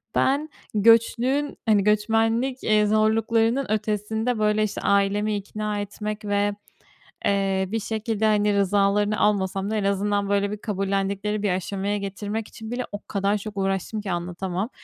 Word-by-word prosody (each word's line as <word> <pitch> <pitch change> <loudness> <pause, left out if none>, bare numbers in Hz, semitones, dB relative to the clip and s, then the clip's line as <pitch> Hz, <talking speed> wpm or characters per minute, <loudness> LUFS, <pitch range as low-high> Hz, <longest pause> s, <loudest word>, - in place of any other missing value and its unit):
ben 285 +4 +2 0.2
göçlüğün, 230 +6 +3
hani, 210 -3 +4
göçmenlik, 225 +5 +1
eee, 215 -1 +3
zorluklarının 225 +4 +2
ötesinde, 220 +2 -1
böyle, 210 0 +2
işte, 210 - -3
ailemi 200 +1 +2
ikna 210 +1 -3
etmek 210 +1 -5
ve, 205 0 +1 0.7
eee, 195 -1 +1
bir 225 - 0
şekilde, 220 0 -2
hani, 210 -1 +3
rızalarını 200 +2 +2
almasam 195 -1 +1
da - - 0
en 210 - 0
azından, 200 0 0
böyle, 200 0 +1
bir 210 - -4
kabullendikleri 200 0 -2
bir 205 - +2
aşamaya 195 +2 -1
getirmek 205 +2 -4
için 220 0 -9
bile 250 +1 -2
o 205 - -5
kadar 200 +1 0
çok 205 0 -8
uğraştım 195 +2 -1
ki 200 -2 -4
anlatamam. 180 +3 -3
210 Hz, 145 wpm, -24 LUFS, 200-220 Hz, 0.7 s, hani